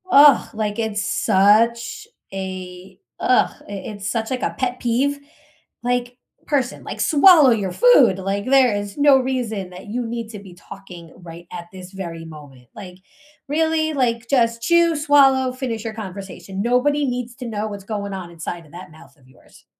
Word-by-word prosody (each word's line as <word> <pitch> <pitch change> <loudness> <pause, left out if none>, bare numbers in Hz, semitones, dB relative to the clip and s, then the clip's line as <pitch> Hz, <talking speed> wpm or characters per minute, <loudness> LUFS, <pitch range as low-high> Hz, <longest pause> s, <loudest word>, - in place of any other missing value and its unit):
Ugh, 285 -5 +6
like, 215 -1 -3
it's 215 -2 -2
such 230 - +2 0.3
a 185 -1 -7 0.2
ugh, 255 - +2 0.2
it 205 +1 -7
it's 200 0 -5
such, 225 0 -3
like, 255 - -2
a - - -2
pet 250 -1 -2
peeve, 270 +4 0 0.6
like, 245 0 -2 0.3
person, 270 -4 -1
like, - - -7
"Swallow 310 -3 +6
your 200 -5 0
food." 275 - +5
Like, 195 +2 -3
there 255 -4 +4
is 205 +2 -5
no 285 -2 +5
reason 240 -7 -3
that 180 +3 -12
you 240 +3 -3
need 230 -1 -5
to 215 -2 -8
be 195 -2 -13
talking 180 -3 -12
right 170 -1 -12
at 170 -1 -8
this 185 -1 -11
very 170 -4 -7
moment, 145 -6 -13
like, 185 -3 -10 0.5
really, 315 +1 0
like, 235 -4 -1
just 230 -3 +1
chew, 340 +5 +3
swallow, 275 -3 +4
finish 245 -4 -4
your 225 - -5
conversation, 195 -2 -7
nobody 265 +6 +1
needs 245 -2 -4
to 250 - -7
know 215 -1 -3
what's 205 -2 -8
going 200 -1 -5
on 185 -3 -7
inside 170 0 -7
of 150 - -20
that 175 -1 -11
mouth 160 +2 -17
of 130 -3 -25
yours. 130 - -22
220 Hz, 175 wpm, -21 LUFS, 190-255 Hz, 0.6 s, Ugh